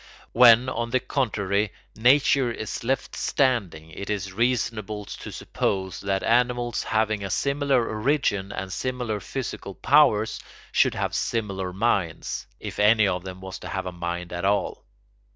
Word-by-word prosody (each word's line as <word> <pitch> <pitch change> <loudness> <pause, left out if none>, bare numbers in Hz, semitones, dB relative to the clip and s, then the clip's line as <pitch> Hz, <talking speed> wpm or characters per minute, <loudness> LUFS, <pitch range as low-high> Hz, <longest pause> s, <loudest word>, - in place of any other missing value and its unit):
When, 120 +1 +7
on 115 -2 -2
the 130 +2 +2
contrary, 105 -6 -1 0.2
nature 130 +1 +4
is 110 -1 -5
left 135 +2 -1
standing, 100 - 0
it 100 +5 -7
is 95 -2 -3
reasonable 110 -2 -1
to - - -8
suppose 95 -2 -2
that 95 -1 -1
animals 120 0 +1
having 110 -2 0
a 100 - -4
similar 140 0 +1
origin 105 -4 0
and 95 -1 -5
similar 125 -4 -2
physical 105 -5 -6
powers 110 - +3 0.3
should - - +3
have - - -2
similar 100 -5 -2
minds, 95 -4 -1
if - - -7
any 110 +1 +5
of 90 -2 -1
them 95 0 -8
was 95 0 -7
to - - -8
have 95 -1 -3
a 90 - -4
mind 85 0 -5
at 85 - -4
all. 100 +1 0
110 Hz, 150 wpm, -25 LUFS, 95-125 Hz, 0.3 s, When